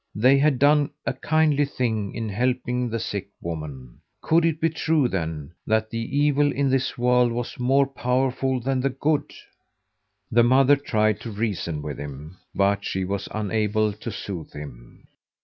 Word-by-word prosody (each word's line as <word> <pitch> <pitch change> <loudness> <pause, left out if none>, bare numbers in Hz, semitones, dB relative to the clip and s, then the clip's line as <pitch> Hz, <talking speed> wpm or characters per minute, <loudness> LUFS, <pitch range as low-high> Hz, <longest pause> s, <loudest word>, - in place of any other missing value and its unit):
They 130 +6 +5
had 145 -2 +3
done 145 +1 +4 0.2
a - - 0
kindly 155 -2 +2
thing 110 -7 -2
in 115 -1 -3
helping 125 +2 -1
the 115 - -2
sick 100 -3 -4
woman. 75 -7 -7 0.2
Could 165 +1 +3
it 160 -2 0
be 165 - +2
true, 160 -3 +1
then, 80 -7 -4 0.2
that 110 0 +1
the 115 - -3 0.2
evil 145 0 +3
in 140 -1 0
this 130 -1 0
world 125 0 +3
was 120 +1 -4
more 135 +3 +3
powerful 130 0 0
than 130 +2 -1
the 135 - +1
good? 145 +3 -1 1.0
The 120 - +5
mother 130 +4 +5
tried 110 -6 0
to 115 - -7
reason 100 -8 -3
with 75 -2 -5
him, 75 +4 -8 0.2
but 100 0 +2
she 95 0 -2
was 100 +1 -3
unable 110 0 0
to 110 +3 -7
soothe 95 -5 -6
him. 60 -5 -11
120 Hz, 165 wpm, -24 LUFS, 100-135 Hz, 1.0 s, They